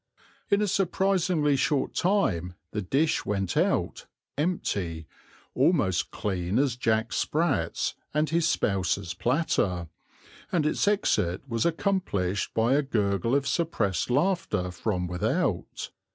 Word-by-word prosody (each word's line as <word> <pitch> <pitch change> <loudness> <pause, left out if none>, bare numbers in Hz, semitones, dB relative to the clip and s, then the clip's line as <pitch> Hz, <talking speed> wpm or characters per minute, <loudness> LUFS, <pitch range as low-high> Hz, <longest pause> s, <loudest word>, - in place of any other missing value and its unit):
In 200 +1 +3
a - - +1
surprisingly 185 -5 +1
short 135 +1 0
time 95 - +1 0.2
the 105 - -2
dish 145 - +1
went 100 -3 -2
out, - - 0 0.3
empty, 100 - -2 0.5
almost - - +2
clean 95 0 -2
as 135 -3 +2
Jack 110 -2 0
Sprat's 155 -2 0 0.2
and 150 +1 +1
his 165 0 +2
spouse's 95 - 0
platter, 95 - 0 0.6
and 165 -4 +1
its 155 - +1
exit 130 - +1
was 115 0 0
accomplished 160 - -1
by 115 +3 +3
a 145 - +4
gurgle 105 -3 0
of 140 0 +1
suppressed 115 - 0
laughter 125 - 0
from 90 0 -2
without. 90 0 -2
125 Hz, 120 wpm, -27 LUFS, -, 0.6 s, a